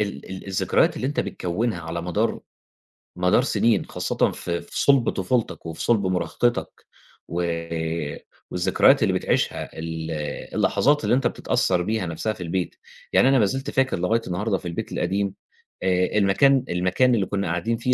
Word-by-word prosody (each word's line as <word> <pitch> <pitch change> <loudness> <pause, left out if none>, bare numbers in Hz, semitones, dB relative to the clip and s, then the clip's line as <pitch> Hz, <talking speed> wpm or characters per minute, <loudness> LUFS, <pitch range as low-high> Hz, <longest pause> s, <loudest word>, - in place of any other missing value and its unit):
ال 100 -2 -4
ال 95 +1 -7
الذكريات 95 -2 +2
اللي 130 - -2
أنت 145 - 0
بتكوّنها 90 +2 -2
على 85 +1 -4
مدار 90 0 -1 0.8
مدار 90 +3 +3
سِنين 115 -3 +2
خاصةً - - 0
في 85 -1 -3
في 85 - -4
صُلب 135 -4 +4
طفولتك 110 +3 -1
وفي 80 -1 -6
صُلب 105 -5 +2
مراهقتك، 95 +7 -1 0.4
و 90 +1 -2 1.1
والذكريات 90 - +4
اللي - - +2
بتعيِشها - - -1
ال 80 0 -4 0.4
اللحظات 150 +1 +2
اللي - - +3
أنت 135 - +2
بتتأثّر 90 -2 0
بيها 110 +1 -1
نَفْسها 85 +7 -2
في 90 - -8
البيت، 90 +1 -2 0.4
يعني 130 - +5
أنا 135 - +4
ما 105 - +4
زِلت 135 +7 -2
فاكر 130 -8 +1
لغاية 110 +6 +1
النهارده 95 +3 -1
في 90 - -8
البيت 85 - -4
القديم، 100 0 -1 0.5
آآ 90 +2 +1
المكان 125 +7 +4
المكان 95 +8 +2
اللي 100 -4 +1
كنا 100 -1 -2
قاعدين 85 +8 -1
فيه 125 +2 +1
95 Hz, 160 wpm, -24 LUFS, 90-115 Hz, 1.1 s, يعني